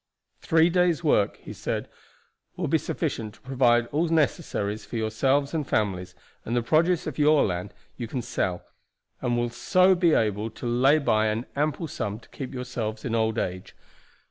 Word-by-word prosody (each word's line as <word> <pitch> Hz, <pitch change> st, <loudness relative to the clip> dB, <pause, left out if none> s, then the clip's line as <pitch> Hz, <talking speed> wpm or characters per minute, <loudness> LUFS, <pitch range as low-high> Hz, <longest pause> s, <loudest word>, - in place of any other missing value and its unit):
"Three 165 Hz, -1 st, +3 dB
days' 175 Hz, -2 st, +2 dB
work," 105 Hz, -10 st, +2 dB
he -, -, -10 dB
said, -, -, -3 dB, 0.7 s
"will -, -, -1 dB
be -, -, +2 dB
sufficient 110 Hz, -1 st, -3 dB
to -, -, -24 dB
provide 125 Hz, -3 st, +3 dB
all 160 Hz, +4 st, +1 dB
necessaries 145 Hz, -, 0 dB
for -, -, -9 dB
yourselves 130 Hz, +6 st, +1 dB
and 155 Hz, -4 st, -2 dB
families 95 Hz, -4 st, -1 dB, 0.3 s
and 115 Hz, -, -3 dB
the 120 Hz, -, +1 dB
produce 165 Hz, +7 st, +2 dB
of 155 Hz, -2 st, -5 dB
your 150 Hz, 0 st, +5 dB
land 90 Hz, +1 st, -3 dB, 0.3 s
you 120 Hz, -, -4 dB
can 125 Hz, +1 st, -4 dB
sell, 90 Hz, -6 st, -2 dB, 0.6 s
and 120 Hz, -1 st, 0 dB
will 120 Hz, 0 st, -1 dB
so 185 Hz, +8 st, +4 dB
be 175 Hz, -3 st, +3 dB
able 105 Hz, 0 st, 0 dB
to 115 Hz, -, -10 dB
lay 125 Hz, +5 st, +4 dB
by 110 Hz, -7 st, +2 dB
an 110 Hz, +3 st, -1 dB
ample 150 Hz, +3 st, -1 dB
sum 105 Hz, -6 st, -4 dB
to -, -, -20 dB
keep 135 Hz, -, -7 dB
yourselves 120 Hz, -4 st, -4 dB
in 120 Hz, -, -2 dB
old 110 Hz, 0 st, +1 dB
age. 90 Hz, -2 st, -4 dB
120 Hz, 175 wpm, -26 LUFS, 110-155 Hz, 0.7 s, your